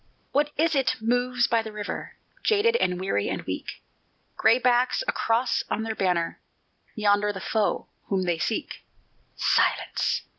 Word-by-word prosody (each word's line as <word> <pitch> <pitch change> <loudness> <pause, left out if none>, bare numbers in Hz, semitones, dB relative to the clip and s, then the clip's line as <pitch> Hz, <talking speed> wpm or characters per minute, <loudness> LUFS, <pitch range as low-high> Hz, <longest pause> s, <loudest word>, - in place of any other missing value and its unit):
What 290 +1 +2
is 325 +2 +2
it 270 -2 +2
moves 245 +2 +1
by 230 -1 +2
the 220 -1 -7
river, 210 -1 -5 0.3
Jaded 440 +2 +3
and 180 - 0
weary 185 - -1
and - - -3
weak, - - -6 0.5
Gray 225 +2 +4
backs 250 - +2
a - - +3
cross 235 +2 +1
on 220 - -1
their 225 0 -2
banner 180 -5 0 0.6
Yonder 205 -1 +2
the 195 - -7
foe 215 +2 0 0.2
whom 190 -2 0
they 175 -2 0
seek. 215 +8 -3 0.5
Silence! - - +1
225 Hz, 150 wpm, -26 LUFS, 200-250 Hz, 0.6 s, Gray